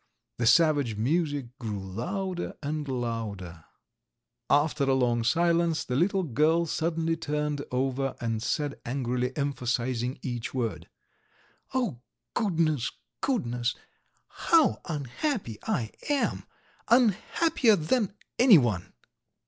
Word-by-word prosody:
The 120 - +2
savage 145 -3 +4
music 140 +1 -1
grew 110 -4 -3
louder 175 - -4
and 150 0 -3
louder.... 110 - -4 0.8
After 145 -1 +3
a 135 -1 +3
long 120 -3 +2
silence 170 +3 +2
the 125 - -2
little 190 +6 +2
girl 160 +4 +2
suddenly 165 0 0
turned 150 -2 -2
over, 135 +1 -1
and 115 -2 -2
said 145 +4 -2
angrily, 125 0 -1
emphasizing 125 -2 -1
each 120 -1 -4
word: 115 -4 -3 0.9
"Oh, 225 - 0 0.3
goodness, 165 - +1 0.3
goodness, 125 - 0 0.5
how 320 - +3
unhappy 150 - -3
I 110 -3 -1 0.2
am! 290 -2 0 0.4
Unhappier 240 - +3
than 200 +5 0 0.2
anyone!" 130 - +5
145 Hz, 100 wpm, -28 LUFS, 120-170 Hz, 0.9 s, anyone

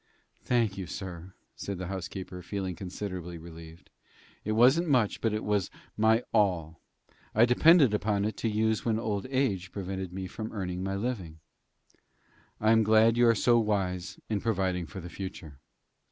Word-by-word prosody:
"Thank 115 -5 +1
you, 95 - -5
sir," 90 0 -7 0.2
said 100 -2 -5
the 90 - -5
housekeeper, 95 0 -6
feeling 95 0 -4
considerably 90 -2 -6
relieved; 80 0 -12 0.5
"it 110 - -1
wasn't 130 +10 +5
much, 125 -7 +2
but 115 - +1
it 105 +1 -2
was 105 -3 0 0.3
my 110 +2 +3
all. 90 -7 +1 0.5
I 110 +2 +7
depended 135 +1 +6
upon 105 -1 0
it 110 -1 -2
to 115 - -1
use 110 +1 +1
when 115 -2 +1
old 110 0 -2
age 105 -9 0
prevented 95 -2 -5
me 95 +1 -5
from 110 +4 -6
earning 90 -3 -3
my 95 0 -2
living." 100 -7 -4 1.2
"I 110 +1 +3
am 115 0 +5
glad 110 +1 +5
you 120 0 +4
are 115 - +5
so 120 +3 +4
wise 95 -4 -1
in 105 -3 -1
providing 95 -5 -1
for 95 +1 -8
the 85 - -8
future." 85 -7 -8
100 Hz, 165 wpm, -29 LUFS, 90-110 Hz, 1.2 s, I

